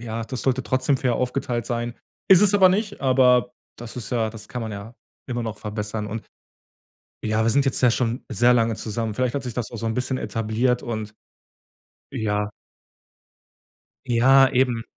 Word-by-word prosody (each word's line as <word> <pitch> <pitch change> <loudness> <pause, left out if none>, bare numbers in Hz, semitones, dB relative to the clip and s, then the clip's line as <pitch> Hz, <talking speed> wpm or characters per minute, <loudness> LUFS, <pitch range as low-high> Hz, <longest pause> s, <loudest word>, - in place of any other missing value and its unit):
ja, 115 -1 -4
das 130 +1 -5
sollte 130 -1 0
trotzdem 130 +2 +1
fair 125 -2 0
aufgeteilt 125 -2 -2
sein. 120 0 -3 0.3
Ist 190 -2 +8
es 205 0 +4
aber 190 -2 +7
nicht, 205 +2 -1
aber 125 -2 +4 0.2
das 120 -1 -9
ist 115 -5 -6
ja 115 -3 0
das 110 -2 -11
kann 125 - -5
man 110 -1 -5
ja 105 +5 -9 0.3
immer 120 -1 -2
noch 110 -2 -5
verbessern. 105 0 -4
Und 110 +1 -6 1.0
ja, 110 +1 +1
wir 115 - +3
sind 140 +4 +3
jetzt 135 - 0
ja 125 - +6
schon 120 0 -1
sehr 120 +1 +4
lange 115 -2 +2
zusammen. 110 0 -3
Vielleicht 125 +2 -1
hat 140 - -2
sich 125 -2 -5
das 115 -1 -4
auch 120 - -6
so 115 - -5
'n 110 - 0
bisschen 130 +2 -1
etabliert 115 +2 -1
und 110 -2 -5 1.0
ja. 105 -1 -1 1.6
Ja, 130 +3 +5
eben. 125 -3 +1
120 Hz, 180 wpm, -23 LUFS, 110-130 Hz, 1.6 s, Ist